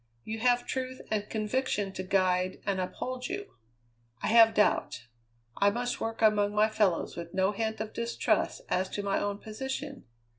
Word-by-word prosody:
You 220 Hz, +1 st, -5 dB
have 245 Hz, +1 st, +3 dB
truth 260 Hz, 0 st, -3 dB
and 210 Hz, -1 st, -1 dB
conviction 215 Hz, -2 st, -1 dB
to 185 Hz, -, -4 dB
guide 185 Hz, -1 st, +1 dB
and 195 Hz, -2 st, 0 dB
uphold 250 Hz, +7 st, -4 dB
you. 390 Hz, +3 st, -6 dB, 0.7 s
I -, -, +1 dB
have 225 Hz, 0 st, +7 dB
doubt. 125 Hz, -, +1 dB, 0.5 s
I 200 Hz, -, +5 dB
must 245 Hz, +4 st, -2 dB
work 225 Hz, 0 st, -2 dB
among 210 Hz, -1 st, +3 dB
my 215 Hz, +1 st, +4 dB
fellows 205 Hz, -6 st, +1 dB
with 170 Hz, 0 st, -7 dB
no 190 Hz, +1 st, +3 dB
hint 220 Hz, +1 st, -2 dB
of 220 Hz, 0 st, -4 dB
distrust 235 Hz, -, 0 dB
as 185 Hz, +1 st, 0 dB
to 205 Hz, -, -4 dB
my 200 Hz, -1 st, +1 dB
own 205 Hz, 0 st, -2 dB
position. 265 Hz, +6 st, -6 dB
215 Hz, 165 wpm, -29 LUFS, 195-245 Hz, 0.7 s, have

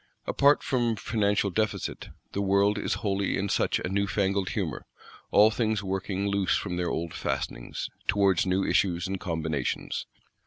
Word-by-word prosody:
Apart 140 Hz, +1 st, +4 dB
from 120 Hz, -3 st, +1 dB
financial 100 Hz, -2 st, 0 dB
Deficit, 110 Hz, +3 st, -2 dB, 0.2 s
the 100 Hz, -, -2 dB
world 100 Hz, +1 st, +3 dB
is -, -, -1 dB
wholly 100 Hz, -1 st, 0 dB
in 100 Hz, +1 st, -1 dB
such -, -, +1 dB
a -, -, -3 dB
new 100 Hz, +2 st, 0 dB
fangled 100 Hz, -2 st, 0 dB
humour; -, -, -3 dB, 0.4 s
all 105 Hz, +2 st, +6 dB
things 110 Hz, -2 st, 0 dB
working 95 Hz, 0 st, -2 dB
loose 100 Hz, -2 st, +1 dB
from 90 Hz, -3 st, -3 dB
their 90 Hz, -1 st, -1 dB
old 85 Hz, -1 st, -3 dB
fastenings, -, -, -3 dB, 0.2 s
towards 95 Hz, -2 st, +3 dB
new 95 Hz, +1 st, +1 dB
issues 85 Hz, -3 st, +1 dB
and 95 Hz, 0 st, -3 dB
combinations. 80 Hz, -7 st, -2 dB
100 Hz, 155 wpm, -27 LUFS, 95-105 Hz, 0.4 s, all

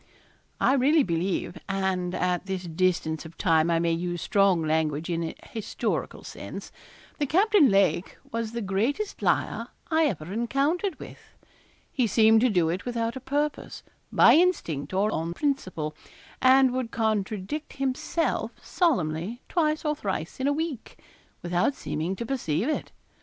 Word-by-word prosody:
I -, -, +4 dB
really 280 Hz, +3 st, +4 dB
believe 175 Hz, 0 st, -2 dB
and 190 Hz, -2 st, -1 dB
at 180 Hz, +1 st, -1 dB
this 190 Hz, -1 st, -3 dB
distance 165 Hz, -2 st, 0 dB
of 165 Hz, 0 st, -12 dB
time 165 Hz, -3 st, +3 dB
I 170 Hz, -, +3 dB
may 170 Hz, 0 st, +1 dB
use 175 Hz, +1 st, -2 dB
strong 195 Hz, -2 st, +3 dB
language 155 Hz, +1 st, 0 dB
in 170 Hz, 0 st, -1 dB
a 160 Hz, -, -4 dB
historical 220 Hz, -3 st, -3 dB
sense -, -, -8 dB, 0.5 s
that 290 Hz, -2 st, -1 dB
Captain 390 Hz, -3 st, +5 dB
Lake 195 Hz, -2 st, +2 dB
was 230 Hz, -1 st, -3 dB
the 235 Hz, -1 st, -3 dB
greatest 230 Hz, -, -1 dB
liar -, -, 0 dB, 0.2 s
I 320 Hz, 0 st, +4 dB
ever 180 Hz, -, -3 dB
encountered 285 Hz, -, 0 dB
with. -, -, -10 dB, 0.7 s
He 250 Hz, -4 st, +1 dB
seemed 220 Hz, +1 st, +5 dB
to 255 Hz, -, +4 dB
do 175 Hz, -6 st, +2 dB
it 175 Hz, +4 st, -2 dB
without 235 Hz, -1 st, -2 dB
a -, -, -4 dB
purpose 290 Hz, +3 st, -3 dB, 0.3 s
by -, -, +7 dB
instinct, 310 Hz, -, +1 dB
or 200 Hz, +3 st, +1 dB
on 165 Hz, 0 st, -2 dB
principle 185 Hz, -, -2 dB, 0.5 s
and 260 Hz, 0 st, +6 dB
would 255 Hz, -2 st, -2 dB
contradict 220 Hz, +5 st, -2 dB
himself 275 Hz, +5 st, -1 dB
solemnly 215 Hz, -, -1 dB
twice 310 Hz, -3 st, 0 dB
or 300 Hz, 0 st, +1 dB
thrice 190 Hz, -, -4 dB
in 260 Hz, -, 0 dB
a -, -, +3 dB
week, 300 Hz, -5 st, -4 dB, 0.5 s
without 175 Hz, +10 st, +1 dB
seeming 170 Hz, -2 st, -3 dB
to 235 Hz, -, -5 dB
perceive 225 Hz, -, -1 dB
it. 310 Hz, -, -2 dB
210 Hz, 150 wpm, -26 LUFS, 175-275 Hz, 0.7 s, by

